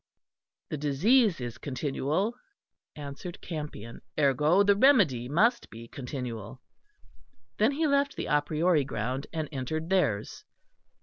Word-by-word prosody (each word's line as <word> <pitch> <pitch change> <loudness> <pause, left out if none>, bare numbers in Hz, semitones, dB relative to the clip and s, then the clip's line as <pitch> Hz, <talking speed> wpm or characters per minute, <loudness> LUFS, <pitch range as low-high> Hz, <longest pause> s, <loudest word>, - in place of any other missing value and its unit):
"The 155 - -2
disease 185 - +3
is 120 -2 -6
continual," 145 - -1 0.6
answered 145 +4 -8
Campion; 150 - -7 0.2
"ergo 150 +7 +4
the 200 0 +4
remedy 195 - +4
must 220 - +2
be 115 +1 -10
continual." 125 -4 -6 1.0
Then 220 +7 +3
he 315 +3 0
left 280 -1 +2
the - - -4
a 145 0 +2
priori 155 +1 +1
ground 130 +2 -3
and 160 -2 -3
entered 155 +5 -4
theirs. 115 - 0
150 Hz, 120 wpm, -28 LUFS, 130-195 Hz, 1.0 s, ergo